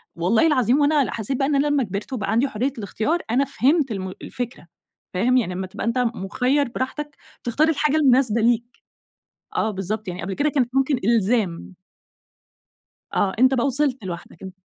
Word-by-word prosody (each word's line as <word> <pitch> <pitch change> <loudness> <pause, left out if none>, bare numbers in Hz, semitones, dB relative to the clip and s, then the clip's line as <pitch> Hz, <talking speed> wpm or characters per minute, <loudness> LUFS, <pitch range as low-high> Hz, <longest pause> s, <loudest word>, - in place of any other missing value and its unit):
والله 195 - +3
العظيم 255 -3 +3
وأنا 290 -1 +4
ل - - -3
حسيت 230 +4 -3
بقى 270 - +1
إن 290 - +1
أنا 280 +2 +2
لمّا 290 -2 +2
كبرت 205 +5 -5
وبقى 205 -4 -2
عندي 235 +5 +2
حرية 260 +2 -2
الإختيار 225 - -1
أنا 270 +3 +3
فهمت 275 0 +1
الم 190 -2 -4
الفكرة 245 -8 -6 0.5
فاهم؟ 245 +8 +2
يعني 185 -7 0
أمّا 185 +1 -4
تبقى 185 - -6
أنت 230 +2 0 0.2
مُخيّر 255 +8 0
براحتك 285 +4 -4 0.3
تختار 295 +7 +2
الحاجة 300 -1 +1
المناسبة 255 -6 +3
ليك، 235 0 +2 0.9
آه 220 - +1
بالضبط 205 +2 -4
يعني، 180 0 -5
قبل 195 - -3
كده 295 +10 +1
كانت 260 -5 +1
ممكن 270 +1 +3
إلزام. 215 -6 +1 1.4
آه 190 -1 +1
أنت 260 +1 +5
بقى 245 0 +1
وصلت 270 -3 +1
لوحدك 170 -2 -8
أن 190 - -7
245 Hz, 175 wpm, -22 LUFS, 205-275 Hz, 1.4 s, أنت